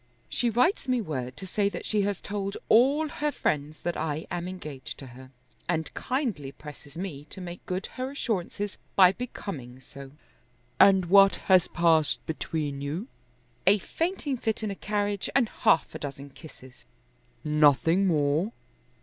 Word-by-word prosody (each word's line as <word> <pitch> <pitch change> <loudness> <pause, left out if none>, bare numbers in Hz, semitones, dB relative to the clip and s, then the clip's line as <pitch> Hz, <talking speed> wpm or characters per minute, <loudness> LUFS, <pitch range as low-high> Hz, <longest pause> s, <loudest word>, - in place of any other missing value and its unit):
"She 240 - 0
writes 260 - +2
me 255 -1 +2
word 130 - -4
to 190 - -6
say 200 +2 +1
that 180 - -7
she 210 -1 +1
has 200 -1 -1
told 200 -1 -4
all 275 +7 +5
her 295 0 -2
friends 150 - -2
that 175 - -2
I 155 0 -2
am 175 0 -3
engaged 150 -9 -7
to 135 - -8
her, 130 +1 -12 0.4
and 160 -2 -1
kindly 235 - -2
presses 150 +1 -12
me 165 -6 -5
to - - -9
make 175 -1 -8
good 185 +2 -2
her 255 0 -5
assurances 205 -6 -3 0.2
by 185 -2 +8
becoming 155 - -7
so." 135 +1 -12 0.7
"And 190 -2 +7
what 195 +2 +6
has 185 -2 +4
passed 165 -3 +2
between 150 -3 -3
you?" 160 - -4 0.6
"A 200 +2 +7
fainting 320 - -2
fit 220 -1 -2
in 210 - -1
a - - -4
carriage 205 0 -2
and 245 -5 +3
half 160 - +2
a - - -6
dozen 140 0 -7
kisses." 130 -4 -14 0.6
"Nothing 150 - +4
more?" 155 +5 +1
180 Hz, 160 wpm, -27 LUFS, 150-210 Hz, 0.7 s, by